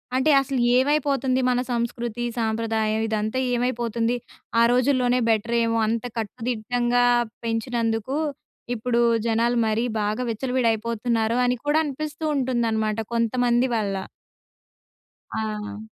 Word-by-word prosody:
అంటే 260 Hz, +4 st, +3 dB
అసలు 270 Hz, -1 st, -2 dB, 0.2 s
ఏమైపోతుంది 270 Hz, -2 st, +1 dB
మన 245 Hz, 0 st, +2 dB
సంస్కృతి, 235 Hz, 0 st, -2 dB
సాంప్రదాయం? 220 Hz, -1 st, 0 dB
ఇదంతా 220 Hz, +3 st, -1 dB
ఏమైపోతుంది? 240 Hz, -1 st, 0 dB, 0.4 s
ఆ -, -, +6 dB
రోజుల్లోనే 250 Hz, -1 st, +2 dB
బెటర్ 225 Hz, +2 st, +1 dB
ఏమో 230 Hz, 0 st, 0 dB
అంత 225 Hz, 0 st, -1 dB
కట్టుదిట్టంగా 240 Hz, +2 st, 0 dB, 0.4 s
పెంచినందుకు, 230 Hz, +2 st, -1 dB, 0.6 s
ఇప్పుడూ 235 Hz, +1 st, 0 dB, 0.3 s
జనాలు 235 Hz, +2 st, +2 dB
మరీ 220 Hz, +3 st, +1 dB, 0.2 s
బాగా 210 Hz, +4 st, -1 dB
విచ్చలవిడయిపోతున్నారు 230 Hz, -1 st, 0 dB
అని 250 Hz, 0 st, +2 dB
కూడా 295 Hz, +1 st, +2 dB
అనిపిస్తూ 300 Hz, +2 st, -5 dB
ఉంటుందనమాట 225 Hz, -4 st, 0 dB
కొంతమంది 240 Hz, +2 st, +2 dB
వల్ల. 205 Hz, -3 st, -1 dB, 1.4 s
ఆ! 215 Hz, -1 st, -4 dB
235 Hz, 100 wpm, -24 LUFS, 225-250 Hz, 1.4 s, ఆ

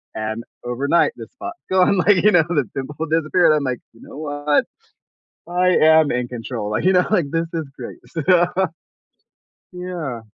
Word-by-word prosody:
and 110 Hz, +1 st, -4 dB, 0.2 s
overnight, 140 Hz, -, +1 dB
the -, -, -9 dB
spot's 355 Hz, 0 st, -8 dB
gone, 185 Hz, +1 st, +4 dB
like, 195 Hz, +2 st, +4 dB
you 210 Hz, -, +6 dB
know, 175 Hz, -, +6 dB
the 145 Hz, -, 0 dB
pimple 145 Hz, +4 st, -4 dB
disappeared, 160 Hz, +1 st, +3 dB
I'm 150 Hz, -, 0 dB
like, 130 Hz, -2 st, -2 dB
"You 115 Hz, -, -20 dB
know -, -, -12 dB
what? 145 Hz, -1 st, 0 dB, 0.8 s
I 180 Hz, +1 st, +2 dB
am 160 Hz, -3 st, +5 dB
in 125 Hz, 0 st, -1 dB
control," 115 Hz, -3 st, -5 dB
like, 105 Hz, -, -1 dB
you 190 Hz, -, +4 dB
know, 180 Hz, -1 st, +4 dB
like, 180 Hz, -7 st, +3 dB
"This 165 Hz, 0 st, -1 dB
is 160 Hz, -2 st, -2 dB
great," 125 Hz, -, -8 dB
so 165 Hz, -, -4 dB, 1.5 s
Yeah. 175 Hz, -9 st, -5 dB
155 Hz, 170 wpm, -20 LUFS, 130-180 Hz, 1.5 s, you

